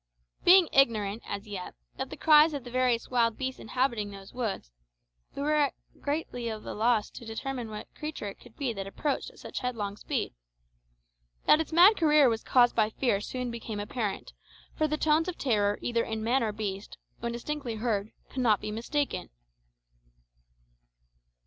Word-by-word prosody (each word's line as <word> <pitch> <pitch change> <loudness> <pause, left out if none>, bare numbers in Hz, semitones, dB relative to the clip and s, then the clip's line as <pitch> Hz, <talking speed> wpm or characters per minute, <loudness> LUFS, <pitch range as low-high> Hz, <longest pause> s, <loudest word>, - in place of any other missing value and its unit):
Being 365 -1 +7
ignorant, 220 -5 +3
as 200 +1 -4
yet, 195 -3 -6 0.2
of - - -3
the - - -8
cries 305 0 +6
of 280 - -5
the 245 - -9
various 250 -2 +1
wild 230 -3 +2
beasts 260 -1 -3
inhabiting 235 -3 -1
those 195 -1 -11
woods, 220 - -3 0.6
we 280 - -3
were 300 -1 +2 0.3
greatly 285 -5 -3
at 215 -1 -6
a - - -5
loss 220 0 +1
to - - -10
determine 235 +1 -4
what 210 -1 -6
creature 305 -8 -5
it 200 - -8
could 240 -2 -17
be 265 -5 -1
that 195 -2 -5
approached 280 +8 -2
at - - -20
such - - -6
headlong 220 -6 -3
speed. - - -2 1.1
That 305 - +6
its 320 - -5
mad 360 +6 +7
career 300 -4 +5
was 225 -1 -1
caused 245 -2 +4
by 215 -2 +3
fear 220 -3 0
soon 250 +2 -4
became 225 -2 -5
apparent, 205 0 -3 0.4
for 310 - +1
the 305 0 -1
tones 315 +2 +2
of 360 - -4
terror 205 -5 +1
either 235 -1 +1
in 220 -1 -4
man 245 +4 +2
or 220 -2 0
beast, 205 -2 -5 0.2
when 235 0 -3
distinctly 245 0 -4
heard, 215 -2 -1 0.2
cannot 240 -6 +2
be 210 - -5
mistaken. 235 -2 -2
235 Hz, 170 wpm, -29 LUFS, 215-280 Hz, 1.1 s, Being